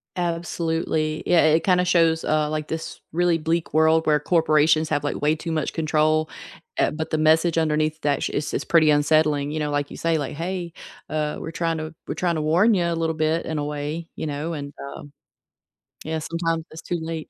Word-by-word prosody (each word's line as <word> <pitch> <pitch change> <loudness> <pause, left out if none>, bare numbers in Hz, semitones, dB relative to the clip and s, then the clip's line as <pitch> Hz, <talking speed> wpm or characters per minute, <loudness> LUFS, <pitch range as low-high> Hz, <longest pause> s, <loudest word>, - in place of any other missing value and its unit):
Absolutely. 165 -2 -1
Yeah, 175 - +5
it 155 +1 +5
kind 180 0 +3
of 180 - +1
shows, 165 -2 +3
uh, 155 -1 +1
like 155 0 -3
this 160 0 -5
really 175 0 +2
bleak 165 +1 -2
world 160 +1 +3
where 150 -1 +4
corporations 155 -1 +3
have 145 -2 0
like 145 - -3
way 150 +2 +2
too 165 +1 -5
much 155 -2 -1
control, 155 0 +1 0.5
uh, - - +3
but 155 +1 -5
the 155 - +1
message 160 +2 +3
underneath 155 -1 0
that 145 -1 0
is 145 - -2
is - - -1
pretty 160 -2 +4
unsettling, 150 -1 +2
you 155 - -3
know, 150 -1 -1
like 145 0 -2
you - - -8
say, 165 -1 +1
like, 145 -1 -4
"Hey, 175 +1 -4 0.4
uh, 150 -1 -2
we're 165 - -6
trying 165 -1 -1
to 155 0 -6
we're - - -2
trying 175 -2 0
to 155 - -1
warn 175 +9 +4
you 180 -4 +1
a 170 - 0
little 165 -1 -1
bit 155 +1 0
in 160 - -3
a 145 - -2
way," 150 +3 -4
you - - -4
know, 150 +3 -3
and, 145 -2 -6 0.2
um 145 - -11 0.9
Yeah, 160 +1 -2
sometimes 165 0 -2
it's 160 - -9
too 175 - -2
late. 160 -1 -5
160 Hz, 210 wpm, -23 LUFS, 155-165 Hz, 0.9 s, Yeah